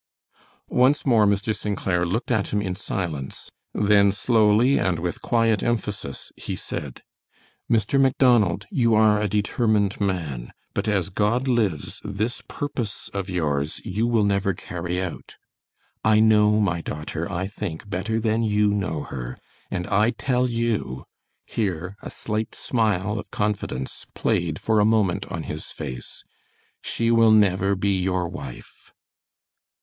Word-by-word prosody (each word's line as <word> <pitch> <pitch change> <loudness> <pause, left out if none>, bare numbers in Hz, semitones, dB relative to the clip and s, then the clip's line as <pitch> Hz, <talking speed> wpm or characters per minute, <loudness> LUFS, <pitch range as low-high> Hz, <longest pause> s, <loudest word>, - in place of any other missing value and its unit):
Once 130 +4 +3
more 115 -6 +5
Mr. 100 +2 +1
St. 105 -1 -3
Clair 90 -2 0
looked 110 +8 -2
at 110 -4 +1
him 105 - 0
in 95 -3 -2
silence. 85 -7 -4 0.2
Then 100 -1 +4
slowly 110 +4 +3
and 90 -3 +1
with 85 +1 -3
quiet 115 -2 +2
emphasis, 105 - -3
he - - -5
said: - - -6 0.7
"Mr. 115 +4 +3
Macdonald, 125 -8 +3
you 120 - +3
are 105 -1 +4
a 105 - +1
determined 105 -1 +1
man, 80 -11 -2 0.2
but - - -2
as 95 -3 0
God 115 +7 +1
lives, 105 - 0
this 110 +4 -2
purpose 120 -7 -4
of 100 -1 -3
yours 75 -5 -1
you 110 +3 0
will 115 -3 +3
never 100 -1 +1
carry 90 0 -4
out. 95 -3 -5 0.7
I 110 0 +5
know 105 -1 +5
my 90 -5 +1
daughter, 80 +4 -4
I 95 0 -2
think, 100 -2 -5
better 100 +4 -1
than 110 0 +1
you 105 -2 +2
know 95 -7 -2
her, 65 -1 -6 0.3
and 90 - -2
I 105 +4 +3
tell 125 0 0
you," 115 - -2 0.4
here 95 -3 -2
a - - -7
slight 110 0 -3
smile 105 -3 0
of 105 - -8
confidence 105 -11 -3
played 80 -3 0
for 110 -1 +2
a - - +5
moment 105 -4 +2
on 85 -3 -4
his 75 +1 -6
face, 65 -2 -7 0.6
"she 115 0 0
will 115 -1 +6
never 100 -2 +4
be 100 +1 +1
your 90 -1 0
wife." 85 +1 -10
105 Hz, 145 wpm, -24 LUFS, 90-110 Hz, 0.7 s, will